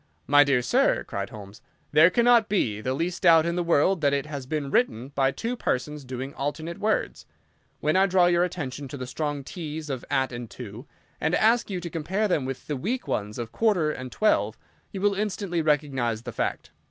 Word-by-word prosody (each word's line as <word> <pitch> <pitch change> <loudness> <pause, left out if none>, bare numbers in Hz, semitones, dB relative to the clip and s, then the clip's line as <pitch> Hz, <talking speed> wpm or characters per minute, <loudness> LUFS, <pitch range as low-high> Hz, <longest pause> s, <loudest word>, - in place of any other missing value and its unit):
"My 145 +1 +6
dear 135 -3 +2
sir," 120 - +2
cried 100 0 -5
Holmes, 105 -1 -11 0.3
"there 155 +3 +7
cannot 235 +1 +4
be 110 - 0
the 130 +4 -1
least 175 +5 -2
doubt 165 -3 +6
in 170 0 -1
the 180 - 0
world 170 +2 +2
that 140 -1 +3
it 140 0 0
has 140 -4 -6
been 145 -2 -3
written 130 - +1
by 135 -1 +1
two 230 - -3
persons 150 - -2
doing 130 +2 -6
alternate 155 +4 -4
words. 215 +1 -1 0.5
When 155 +2 +1
I 190 +1 +5
draw 180 -1 +4
your 175 0 +3
attention 145 -6 -4
to 140 - -7
the 130 - -5
strong 145 +2 -3
t's 155 -1 -6
of 130 -3 -4
'at' 130 0 +1
and 120 -2 -6
'to', 120 +2 -9 0.3
and 160 +3 +1
ask 230 +1 +3
you 190 -3 -2
to 170 - -5
compare 185 +7 -1
them 155 -8 0
with 135 0 -5
the 150 - -3
weak 230 - -3
ones 105 0 -2
of 115 -2 -5
'quarter' 190 -9 +2
and 130 -3 -7
'twelve,' 110 - +1 0.3
you 190 - -5
will 205 0 +3
instantly 195 -4 -2
recognise 135 -7 0
the 120 - -6
fact. - - -3
150 Hz, 205 wpm, -26 LUFS, 130-180 Hz, 0.5 s, there